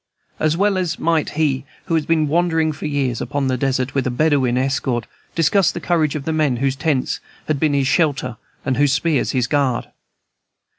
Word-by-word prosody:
As 155 +1 +1
well 195 -1 +2
might 165 -2 +1
he 145 -4 +1 0.2
who 170 - -3
has 160 -2 +1
been 160 -2 +2
wandering 160 0 +2
for 155 +1 -5
years 135 -5 -1
upon 140 -2 -1
the 130 - +1
desert, 130 0 -1
with 135 -2 0
a - - +1
Bedouin 130 -2 +2
escort, 130 -2 0 0.3
discuss 175 +4 +3
the - - -5
courage 160 -4 +1
of 145 -2 -4
the 160 - -1
men 150 -5 +2
whose 135 +1 0
tents 135 -1 0 0.3
have 155 -3 0
been 150 -1 +2
his 140 -1 +2
shelter 135 -5 +1 0.3
and 130 -2 0
whose 145 -1 +3
spears 145 0 +1
his 125 -3 +1
guard. 135 -3 0
145 Hz, 190 wpm, -20 LUFS, 130-160 Hz, 0.3 s, discuss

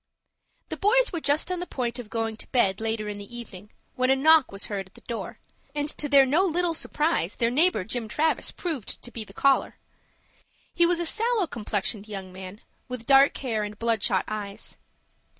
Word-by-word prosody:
The - - -4
boys - - +3
were 340 - -1
just 295 +5 +1
on 365 - -1
the 355 - -4
point 245 -1 -3
of 230 -4 -8
going 225 -1 -2
to - - -10
bed, 195 -5 +2
later 220 -1 -2
in 205 -1 -5
the 205 +4 -10
evening, 210 -4 -10 0.2
when 255 0 0
a 265 - +5
knock 310 +1 +5
was 195 0 -5
heard 195 -2 -4
at 190 - -26
the - - -15
door, 225 -6 -6 0.4
and, 290 0 -1
to 295 -1 -2
their 275 -1 +7
no 300 +8 +3
little 350 -1 +1
surprise, 300 - -1
their 230 0 +1
neighbor, 305 - +3
Jim 225 +3 -4
Travis, 310 +8 +1
proved 310 - -4
to 240 - -8
be 230 - -4
the 205 - -15
caller. 275 +6 +2 1.0
He 345 - +4
was 350 -1 +3
a 345 - -1
sallow 455 +3 +2
complexioned 210 - -3
young 195 -3 -7
man, 190 +2 -9 0.3
with 250 -2 -6
dark 275 +1 +5
hair 230 -5 -2
and 210 0 -5
bloodshot 225 -4 +1
eyes. 210 0 -6
240 Hz, 200 wpm, -26 LUFS, 210-305 Hz, 1.0 s, their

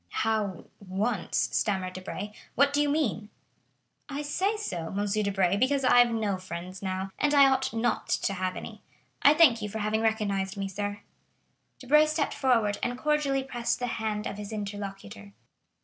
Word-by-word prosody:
"How 215 -5 -1
once?" 200 +1 -1
stammered 190 -3 0
Debray; 190 +2 -6 0.2
"what 280 +2 +4
do 290 - +3
you 295 - +2
mean?" 235 -8 -1 0.8
"I 285 +1 -4
say 380 +9 0
so, 175 - -4
M. 205 - 0
Debray, 200 -2 +1
because 270 +4 +2
I 250 -1 +6
have 245 0 +6
no 215 -4 -1
friends 185 0 -7
now, 190 0 -3
and 295 0 +2
I 280 -1 +8
ought 265 0 +1
not 230 0 -1
to 195 - 0
have 185 -1 -2
any. - - -8 0.4
I 290 - +6
thank 265 -9 +6
you 210 - -3
for 220 - -5
having 215 +1 0
recognized 205 -3 0
me, 195 0 -2
sir." 205 +2 -4 0.8
Debray 300 +4 +4
stepped 305 -1 -1
forward, 230 -6 +1
and 245 0 -2
cordially 285 -2 +1
pressed 240 -3 -2
the 245 - -2 0.2
hand 210 -1 -2
of 200 - -5
his 205 0 -7
interlocutor. 195 - -7
215 Hz, 170 wpm, -28 LUFS, 195-265 Hz, 0.8 s, I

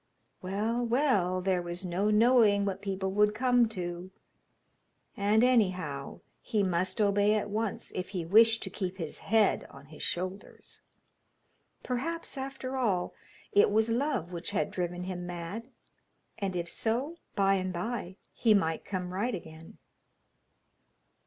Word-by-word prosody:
Well, 215 +6 -1
well, 230 -8 +2
there 185 -1 +1
was 175 +2 -5
no 185 +4 0
knowing 215 -2 +5
what 195 -1 -3
people 190 -1 -2
would 210 +1 +3
come 245 -1 +3
to; 175 -3 -5 1.1
and, 210 +3 +3
anyhow, 185 - +1 0.2
he 210 -2 0
must 185 +2 0
obey 205 0 +3
at 210 -1 -2
once, 215 -1 -2
if 185 0 -4
he 180 -4 -3
wished 225 +5 +5
to 190 - -5
keep 190 -1 -4
his 165 -4 -5
head 220 -1 +2
on - - -13
his 150 +1 -13
shoulders. 185 +3 -4 1.0
Perhaps, 300 +8 -3
after 265 -1 -5
all, 205 -9 0 0.4
it 205 - +5
was 220 +2 +2
love 235 - 0
which 170 0 -4
had 200 - -1
driven 180 0 -3
him 180 -1 -5
mad, 175 +7 -6 0.7
and, 195 -3 -2
if 170 -1 -2
so, 250 - -2 0.2
by 195 -1 +3
and 185 -1 0
by 185 0 -4 0.2
he 220 -3 +4
might 160 -5 0
come 180 -2 -4
right 215 +5 -1
again. 160 -2 -11
200 Hz, 140 wpm, -30 LUFS, 180-225 Hz, 1.1 s, knowing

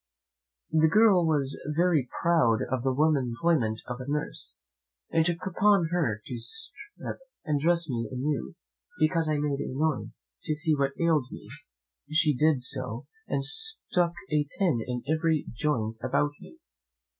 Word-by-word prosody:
The 160 0 +4
girl 205 -5 +5
was 140 -3 +2 0.2
very 165 -7 +2
proud 125 -10 +3
of 130 -2 0
the 135 +1 +1
womanly 145 -2 +2
employment 120 -4 0
of 125 0 -5
a 130 - -7
nurse, 150 +1 -3 0.5
and 160 - +3
took 170 +1 -1
upon 190 -2 +3
her 120 -12 0
to 125 - -5
strip 445 - -4 0.3
and 150 -2 +1
dress 170 +2 +2
me 115 -5 -3
a - - -6
new, 140 +2 -2 0.4
because 160 0 +2
I 155 - +1
made 145 -1 -1
a - - -3
noise, 150 +2 -2 0.2
to 155 - 0
see 155 +1 +1
what 140 -1 0
ailed 160 -6 +2
me; - - -10 0.6
she 155 -1 +3
did 150 -1 +2
so, 125 -2 -3 0.2
and - - -1
stuck 440 - +1 0.2
a 150 -1 +1
pin 175 - +2
in 125 -1 -3
every 160 0 +1
joint 115 -4 -1
about 140 +3 +1
me. 65 - -14
150 Hz, 155 wpm, -28 LUFS, 130-170 Hz, 0.6 s, girl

